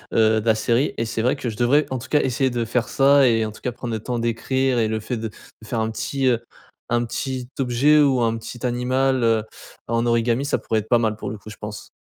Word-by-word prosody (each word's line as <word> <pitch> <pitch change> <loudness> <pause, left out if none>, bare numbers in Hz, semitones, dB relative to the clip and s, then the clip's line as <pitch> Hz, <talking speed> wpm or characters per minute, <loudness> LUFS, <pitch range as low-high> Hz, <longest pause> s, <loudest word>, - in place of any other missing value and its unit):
heu, 110 0 +4
de - - -11
la 110 - +5
série 120 +5 +1
et 115 - -1
c'est 110 0 -2
vrai 125 +3 +2
que 125 - -5
je 105 - -10
devrais 135 +5 +3
en 130 - -2
tout 120 - -10
cas 150 - +3
essayer 130 +1 +1
de 120 -1 -2
faire 120 +1 -1
ça, 140 0 +5
et 115 -2 +2
en 110 - -4
tout 105 - -15
cas 125 - -2
prendre 120 -1 -6
le 110 - -2
temps 120 +3 -3
d'écrire 120 +2 0
et 110 - +2
le 110 0 -1
fait 125 +4 -4
de 110 0 -3
de 110 0 -16
faire 115 - -2
un 110 0 -1
petit, 135 +4 -2
heu, 125 -3 +3 0.5
un 120 0 +1
petit 130 +1 -4
objet 135 +4 +4
ou 135 -3 +4
un 115 -1 +1
petit 120 +2 -7
animal, 130 +1 +1
heu, 115 -1 +3 0.4
en 115 +1 0
origami 115 +2 +1
ça 140 - 0
pourrait 110 - -1
être 105 - -8
pas 120 - +5
mal 110 -2 0
pour - - -5
le 110 - -6
coup 110 +2 -12
je - - -10
pense. 105 0 -8
120 Hz, 270 wpm, -22 LUFS, 110-130 Hz, 0.5 s, la